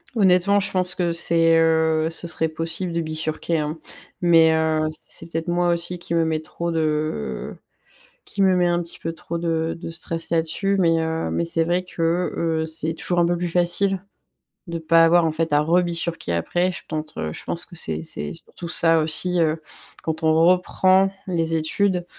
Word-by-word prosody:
Honnêtement, 195 Hz, 0 st, +4 dB
je 205 Hz, -, 0 dB
pense 180 Hz, -1 st, +1 dB
que 175 Hz, -2 st, 0 dB
c'est, 165 Hz, -1 st, +3 dB
heu, 160 Hz, -1 st, +2 dB
ce 165 Hz, +1 st, -5 dB
serait 160 Hz, -1 st, 0 dB
possible 165 Hz, +3 st, -3 dB
de 170 Hz, -, 0 dB
bifurquer, 155 Hz, +1 st, -2 dB
hein, 150 Hz, +2 st, -3 dB, 0.4 s
mais 165 Hz, -2 st, +5 dB
heu, 160 Hz, -1 st, +1 dB, 0.2 s
c'est 165 Hz, 0 st, -5 dB
peut-être 165 Hz, +2 st, -3 dB
moi 175 Hz, 0 st, +1 dB
aussi 175 Hz, +1 st, -1 dB
qui 170 Hz, -1 st, -4 dB
me 165 Hz, -1 st, +2 dB
met 160 Hz, -1 st, 0 dB
trop 170 Hz, +2 st, -5 dB
de 155 Hz, -, -2 dB, 0.7 s
qui 205 Hz, -, -4 dB
me 190 Hz, -1 st, +4 dB
met 180 Hz, -, +3 dB
un 175 Hz, 0 st, +1 dB
petit 170 Hz, -, -7 dB
peu 165 Hz, -, -4 dB
trop 170 Hz, +1 st, -6 dB
de 165 Hz, -1 st, -1 dB
de -, -, -6 dB
stress 165 Hz, -1 st, -2 dB
là-dessus, 170 Hz, +5 st, +1 dB
mais 165 Hz, -2 st, +3 dB
heu, 160 Hz, 0 st, -2 dB
mais 170 Hz, -, -1 dB
c'est 165 Hz, 0 st, 0 dB
vrai 175 Hz, +2 st, 0 dB
que, 175 Hz, -2 st, -6 dB, 0.6 s
heu, -, -, -4 dB
c'est 160 Hz, 0 st, -3 dB
toujours 175 Hz, +1 st, -1 dB
un 170 Hz, -, +3 dB
peu 175 Hz, -, +1 dB
plus 175 Hz, +1 st, -2 dB
facile, 180 Hz, +3 st, +1 dB, 0.6 s
de 170 Hz, -1 st, -4 dB
pas 165 Hz, +1 st, +4 dB
avoir, 170 Hz, +1 st, +4 dB
en 160 Hz, -, +1 dB
fait, 160 Hz, -1 st, -2 dB
à 145 Hz, -, +4 dB
rebifurquer 170 Hz, -, 0 dB
après, 175 Hz, -, 0 dB
je -, -, -7 dB
pense 155 Hz, -, -5 dB
je -, -, -9 dB
pense 170 Hz, -, -2 dB
que -, -, -15 dB
c'est 80 Hz, -, -2 dB
c'est 75 Hz, -2 st, -5 dB
surtout 170 Hz, -, -10 dB
ça 165 Hz, 0 st, +4 dB
aussi, 170 Hz, +3 st, +1 dB
heu, 160 Hz, 0 st, 0 dB, 0.4 s
quand 160 Hz, 0 st, -3 dB
on 160 Hz, 0 st, +4 dB
reprend 185 Hz, +3 st, +3 dB, 0.2 s
les 165 Hz, -3 st, -1 dB
études, 180 Hz, +3 st, +1 dB
165 Hz, 190 wpm, -22 LUFS, 160-175 Hz, 0.7 s, mais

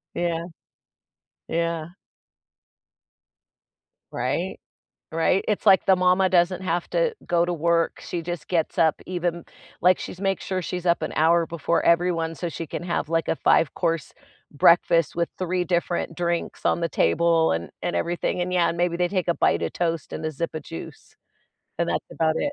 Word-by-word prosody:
Yeah. 170 Hz, -1 st, -1 dB, 1.0 s
Yeah. 165 Hz, -1 st, -1 dB, 2.2 s
Right? -, -, -2 dB, 0.6 s
Right, 165 Hz, +3 st, +2 dB
it's 210 Hz, -, -1 dB
like 190 Hz, -, +6 dB
the 190 Hz, -, +5 dB
mama 185 Hz, +1 st, +3 dB
doesn't 180 Hz, +1 st, +2 dB
have 175 Hz, -1 st, -1 dB
to -, -, +1 dB
go 170 Hz, -1 st, +2 dB
to 175 Hz, -, -1 dB
work, 170 Hz, 0 st, +1 dB
she 170 Hz, -, -5 dB
just 175 Hz, -1 st, -6 dB
gets 165 Hz, -3 st, -1 dB
up 160 Hz, -2 st, +4 dB
even 175 Hz, -2 st, -3 dB, 0.4 s
like, 180 Hz, +1 st, +5 dB
she's 180 Hz, -, -7 dB
make 195 Hz, -1 st, 0 dB
sure 185 Hz, -1 st, -3 dB
she's 180 Hz, +1 st, -4 dB
up 170 Hz, -1 st, +2 dB
an 155 Hz, -, -3 dB
hour 165 Hz, +2 st, +4 dB
before 170 Hz, 0 st, -1 dB
everyone 170 Hz, -1 st, +2 dB
so 175 Hz, -, -4 dB
she 165 Hz, +1 st, -6 dB
can -, -, -5 dB
have, 170 Hz, -3 st, -2 dB
like, 165 Hz, 0 st, 0 dB
a -, -, +1 dB
5 160 Hz, -2 st, +3 dB
course 165 Hz, -4 st, -2 dB, 0.4 s
breakfast 165 Hz, +2 st, +4 dB
with 170 Hz, 0 st, 0 dB
3 180 Hz, 0 st, -1 dB
different 175 Hz, -2 st, -1 dB
drinks 170 Hz, -1 st, -2 dB
on -, -, +2 dB
the 170 Hz, -, 0 dB
table 165 Hz, -, +2 dB
and 85 Hz, +1 st, -3 dB
and -, -, -2 dB
everything. 175 Hz, -, -1 dB
And, 180 Hz, +1 st, -1 dB
yeah, 175 Hz, -1 st, +3 dB
and 170 Hz, -, -6 dB
maybe 175 Hz, -1 st, +1 dB
they 175 Hz, 0 st, +1 dB
take 185 Hz, -1 st, -2 dB
a 170 Hz, -, +3 dB
bite -, -, +2 dB
of -, -, -3 dB
toast 165 Hz, -4 st, -2 dB
and 160 Hz, -, -5 dB
a 155 Hz, -, -1 dB
zip 160 Hz, +2 st, -4 dB
of 155 Hz, -, -4 dB
juice, 80 Hz, -, -10 dB, 0.7 s
and -, -, +1 dB
that's -, -, -1 dB
about 160 Hz, -1 st, +1 dB
it. 290 Hz, -, -1 dB
170 Hz, 180 wpm, -24 LUFS, 165-180 Hz, 2.2 s, like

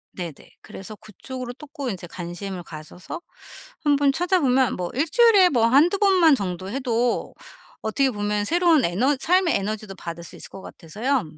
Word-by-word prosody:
네네. 175 Hz, -4 st, -5 dB, 0.3 s
그래서 205 Hz, +3 st, -10 dB
그쪽으로 245 Hz, +5 st, -8 dB
또 300 Hz, -, -12 dB
꼭 275 Hz, -3 st, -4 dB
이제 185 Hz, -5 st, -5 dB
관심을 175 Hz, +2 st, -6 dB
가져서 160 Hz, -, -9 dB, 0.6 s
한번 285 Hz, -2 st, +3 dB
찾아 355 Hz, +5 st, +1 dB
보면 260 Hz, -4 st, +2 dB
뭐 180 Hz, -1 st, -4 dB
1 300 Hz, +5 st, 0 dB
주일에 430 Hz, -4 st, +6 dB
뭐 235 Hz, -6 st, +2 dB
1-2 300 Hz, +10 st, +4 dB
번만 370 Hz, -7 st, +5 dB
정도 185 Hz, -4 st, -4 dB
해도 245 Hz, -2 st, -1 dB, 0.5 s
어떻게 260 Hz, +5 st, +1 dB
보면 205 Hz, -1 st, -1 dB
새로운 335 Hz, -2 st, +3 dB
에너 245 Hz, +12 st, +1 dB
삶의 360 Hz, +3 st, +2 dB
에너지도 205 Hz, 0 st, -5 dB
받을 170 Hz, -1 st, -7 dB
수 -, -, -11 dB
있을 -, -, -6 dB
것 195 Hz, -, -10 dB
같아서요. 220 Hz, -, -2 dB
245 Hz, 325 characters per minute, -23 LUFS, 195-290 Hz, 0.6 s, 주일에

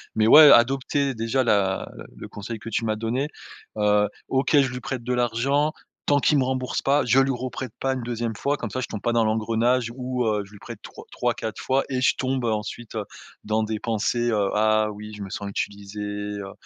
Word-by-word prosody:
Mais 110 Hz, 0 st, +3 dB
ouais, 150 Hz, +4 st, +10 dB
adopter, 135 Hz, +3 st, +3 dB
déjà, 115 Hz, +4 st, 0 dB
la 100 Hz, -4 st, +1 dB, 0.3 s
le -, -, -8 dB
conseil 110 Hz, +2 st, -7 dB
que 115 Hz, -, -8 dB
tu 115 Hz, +1 st, -1 dB
m'as 110 Hz, -1 st, 0 dB
donné, 125 Hz, +6 st, -2 dB, 0.5 s
heu, 105 Hz, 0 st, +3 dB, 0.2 s
OK, 135 Hz, 0 st, +1 dB
je 130 Hz, -2 st, +2 dB
lui 125 Hz, -, -5 dB
prête 130 Hz, -1 st, -4 dB
de 125 Hz, +1 st, -1 dB
l'argent 125 Hz, +5 st, +1 dB, 0.4 s
tant 145 Hz, -, +4 dB
qu'il 145 Hz, +1 st, +3 dB
me 130 Hz, -, +2 dB
rembourse 130 Hz, 0 st, -2 dB
pas, 140 Hz, +1 st, +2 dB
je 130 Hz, +2 st, +4 dB
lui 135 Hz, 0 st, +3 dB
reprête 130 Hz, -1 st, -5 dB
pas 135 Hz, 0 st, 0 dB
une 130 Hz, -, -4 dB
2e 115 Hz, -2 st, -3 dB
fois 145 Hz, +5 st, -1 dB
comme 115 Hz, -, -5 dB
ça, 130 Hz, -, -3 dB
je -, -, -3 dB
tombe 105 Hz, -, -5 dB
pas 120 Hz, -, 0 dB
dans 115 Hz, -1 st, +3 dB
l'engrenage 115 Hz, +2 st, +1 dB
où, 125 Hz, -1 st, -2 dB
heu, 105 Hz, -2 st, 0 dB
je 100 Hz, -, -19 dB
lui 105 Hz, -, -13 dB
prête -, -, -10 dB
trois -, -, -11 dB
3-4 110 Hz, -2 st, -2 dB
fois 135 Hz, +1 st, +1 dB
et 130 Hz, -2 st, -1 dB
je 125 Hz, -, +3 dB
tombe 130 Hz, -2 st, -1 dB
ensuite, 110 Hz, +1 st, -3 dB
heu, 110 Hz, -, -2 dB, 0.4 s
dans 110 Hz, +1 st, +1 dB
des 110 Hz, 0 st, -3 dB
pensées, 120 Hz, +2 st, 0 dB
heu: 100 Hz, -2 st, +1 dB
«Ah 110 Hz, 0 st, +3 dB
oui, 105 Hz, +1 st, -9 dB
je 105 Hz, -, -9 dB
me 95 Hz, -, -7 dB
sens 100 Hz, +1 st, -5 dB
utilisé», 100 Hz, +1 st, -5 dB
heu 105 Hz, -1 st, -5 dB
115 Hz, 220 wpm, -24 LUFS, 105-130 Hz, 0.5 s, ouais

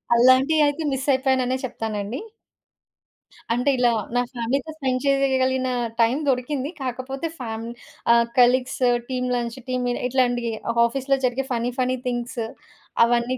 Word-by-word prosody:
అలాంటియి 260 Hz, +6 st, +5 dB
అయితే 290 Hz, +3 st, -2 dB
మిస్సయిపోయాననే 260 Hz, -1 st, +1 dB
చెప్తానండి. 220 Hz, -1 st, -4 dB, 1.3 s
అంటే, 250 Hz, +4 st, +1 dB
ఇలా 245 Hz, -1 st, +4 dB, 0.2 s
నా 245 Hz, -, +4 dB
ఫ్యామిలీ‌తో 255 Hz, +5 st, -2 dB
స్పెండ్ 260 Hz, -4 st, -1 dB
చేయగలిగిన 260 Hz, -2 st, +2 dB, 0.3 s
టైం 230 Hz, +4 st, +3 dB
దొరికింది. 265 Hz, +2 st, -1 dB
కాకపోతే 260 Hz, +4 st, -4 dB
ఫ్యామ్ 225 Hz, -2 st, -5 dB, 0.5 s
ఆహ్, 235 Hz, 0 st, +4 dB
colleagues, 255 Hz, +2 st, +3 dB, 0.3 s
team 250 Hz, -1 st, -1 dB
lunch, 240 Hz, 0 st, -3 dB
team 250 Hz, -1 st, -1 dB
meet 245 Hz, -, -2 dB
ఇట్లాంటియి 245 Hz, -2 st, +1 dB, 0.3 s
ఆఫీస్‌లో 270 Hz, +3 st, 0 dB
జరిగే 255 Hz, +2 st, -2 dB
ఫన్నీ 240 Hz, 0 st, 0 dB
ఫన్నీ 255 Hz, 0 st, +1 dB
థింగ్స్ 240 Hz, 0 st, -3 dB, 0.6 s
అవన్నీ 240 Hz, +2 st, +1 dB
255 Hz, 120 wpm, -23 LUFS, 240-265 Hz, 1.3 s, అలాంటియి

